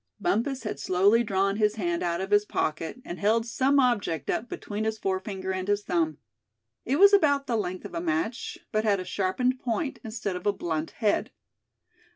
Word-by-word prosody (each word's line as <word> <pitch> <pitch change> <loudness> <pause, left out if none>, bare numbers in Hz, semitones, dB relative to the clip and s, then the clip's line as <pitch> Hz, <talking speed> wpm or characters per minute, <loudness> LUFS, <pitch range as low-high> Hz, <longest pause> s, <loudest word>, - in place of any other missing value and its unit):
Bumpus 245 +6 0
had 140 - -4
slowly 195 +9 +3
drawn 195 -1 +1
his 210 -1 +2
hand 175 -5 -1
out 170 0 -1
of 195 +1 -5
his 205 0 +5
pocket, 160 +1 -2
and 175 - -6
held 225 +3 +2
some 270 +4 +2
object 210 - +1
up 235 +2 -2
between 210 +1 -4
his 220 0 -1
forefinger 190 -1 -3
and 185 0 -3
his 205 0 +1
thumb. 160 -5 0 0.7
It 265 - +1
was 400 +3 +7
about 285 -8 +4
the 240 - -1
length 185 -4 -3
of - - -8
a 170 - -2
match, 165 +9 -2
but 215 -1 +1
had 205 -3 +2
a 185 - -5
sharpened 205 +8 0
point, 255 +4 -2
instead 215 -4 -4
of 180 +3 -4
a 205 - +3
blunt 165 -4 -3
head. 210 -2 0
205 Hz, 195 wpm, -27 LUFS, 185-230 Hz, 0.7 s, was